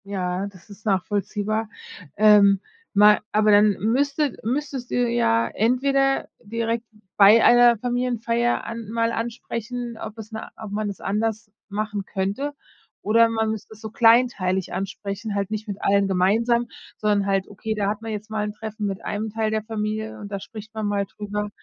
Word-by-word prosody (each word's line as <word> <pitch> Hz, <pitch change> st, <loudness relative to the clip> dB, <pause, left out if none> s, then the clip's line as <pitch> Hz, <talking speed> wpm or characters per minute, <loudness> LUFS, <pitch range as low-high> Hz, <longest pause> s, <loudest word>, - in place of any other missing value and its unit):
Ja, 190 Hz, -1 st, -2 dB
das 185 Hz, -3 st, -15 dB
ist 205 Hz, +2 st, -14 dB
nachvollziehbar, 205 Hz, +2 st, -1 dB, 0.5 s
ähm, 205 Hz, -2 st, +6 dB, 0.3 s
ma 210 Hz, 0 st, +6 dB
aber 215 Hz, 0 st, +3 dB
dann 205 Hz, 0 st, +6 dB
müsstet 275 Hz, -, 0 dB
müsstest 265 Hz, +1 st, -3 dB
du -, -, -2 dB
ja 115 Hz, -, +2 dB
entweder 270 Hz, +4 st, +1 dB
direkt 230 Hz, +2 st, -2 dB, 0.3 s
bei 210 Hz, +3 st, +7 dB
einer 240 Hz, -1 st, +6 dB
Familienfeier 240 Hz, 0 st, 0 dB
an 230 Hz, -2 st, -6 dB
mal 230 Hz, +1 st, 0 dB
ansprechen, 235 Hz, +1 st, -4 dB
ob 220 Hz, +1 st, -7 dB
es 220 Hz, 0 st, -9 dB
na 220 Hz, 0 st, -6 dB
ob 215 Hz, -2 st, -8 dB
man's 205 Hz, -1 st, -3 dB
anders 215 Hz, +1 st, -2 dB, 0.2 s
machen 210 Hz, 0 st, -3 dB
könnte 200 Hz, +10 st, -3 dB, 0.5 s
oder 230 Hz, +2 st, +4 dB
man 220 Hz, -1 st, 0 dB
müsste 220 Hz, 0 st, -7 dB
es 215 Hz, -, -18 dB
so 220 Hz, -2 st, -7 dB
kleinteilig 225 Hz, -6 st, +3 dB
ansprechen, 200 Hz, +2 st, -4 dB
halt 200 Hz, 0 st, -2 dB
nicht 215 Hz, 0 st, -4 dB
mit 200 Hz, -2 st, -4 dB
allen 200 Hz, 0 st, +3 dB
gemeinsam, 225 Hz, +6 st, +2 dB, 0.3 s
sondern 205 Hz, -2 st, +1 dB
halt, 195 Hz, -1 st, +1 dB
okay, 220 Hz, +2 st, -4 dB
da 205 Hz, -2 st, -1 dB
hat 210 Hz, +1 st, -3 dB
man 225 Hz, 0 st, -5 dB
jetzt 215 Hz, +1 st, -6 dB
mal 215 Hz, -1 st, -1 dB
'n 210 Hz, 0 st, -3 dB
Treffen 215 Hz, -1 st, -5 dB
mit 195 Hz, -1 st, -5 dB
einem 215 Hz, +1 st, -3 dB
Teil 220 Hz, 0 st, -1 dB
der 215 Hz, -1 st, -1 dB
Familie 215 Hz, 0 st, -4 dB
und 205 Hz, -1 st, -9 dB
da 200 Hz, -, -3 dB
spricht 220 Hz, +2 st, -10 dB
man 220 Hz, -1 st, -2 dB
mal 200 Hz, -1 st, 0 dB
drüber, 210 Hz, +1 st, -5 dB
215 Hz, 170 wpm, -23 LUFS, 205-230 Hz, 0.5 s, bei